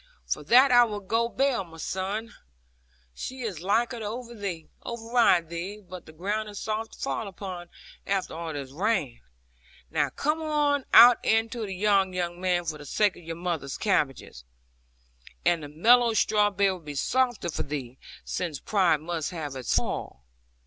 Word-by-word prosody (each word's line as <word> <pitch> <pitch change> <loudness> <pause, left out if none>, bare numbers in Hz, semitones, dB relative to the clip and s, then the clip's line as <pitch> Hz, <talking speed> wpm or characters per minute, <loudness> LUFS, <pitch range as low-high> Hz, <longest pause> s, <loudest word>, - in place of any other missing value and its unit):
'For - - -2
that 255 +3 +6
I 245 0 +8
will 210 -3 -2
go 225 +4 0
bail, 265 -4 +1
my 165 -2 -14
son. 200 +7 -3 0.8
She 260 - -6
is 195 -8 -4
liker 230 +6 +1
to 220 - -5
override 225 -2 -1
thee. 180 +5 -5
But 185 -1 -10
the - - -11
ground 205 +7 -3
is 205 - -9
soft 220 +2 -3
to - - -14
fall 225 - -2
upon, 185 -2 -7 0.4
after 195 -1 -1
all 165 0 -5
this 140 -3 -6
rain. 165 - -1 0.7
Now - - +1
come 305 +3 -1 0.5
out 240 0 +9
into 225 0 +1
the 190 - -5
yard, 195 -1 +2
young 175 0 -3
man, 180 -2 +1
for 155 -2 -4
the 145 - -10
sake 210 +7 +2
of - - -13
your 165 0 -5
mother's 170 -5 -3
cabbages. 135 - -1 1.0
And 175 -1 +3
the 145 - -8
mellow 230 +9 +4
straw 210 -1 +3
bed 200 -1 +2
will 185 - -5
be 150 -3 -8
softer 245 - 0
for - - -3
thee, 135 -3 -5 0.3
since 165 -6 -3
pride 180 -7 +2
must 165 -1 -3
have 155 -6 -5
its 130 -4 -1
fall. - - -3
190 Hz, 165 wpm, -27 LUFS, 165-225 Hz, 1.0 s, out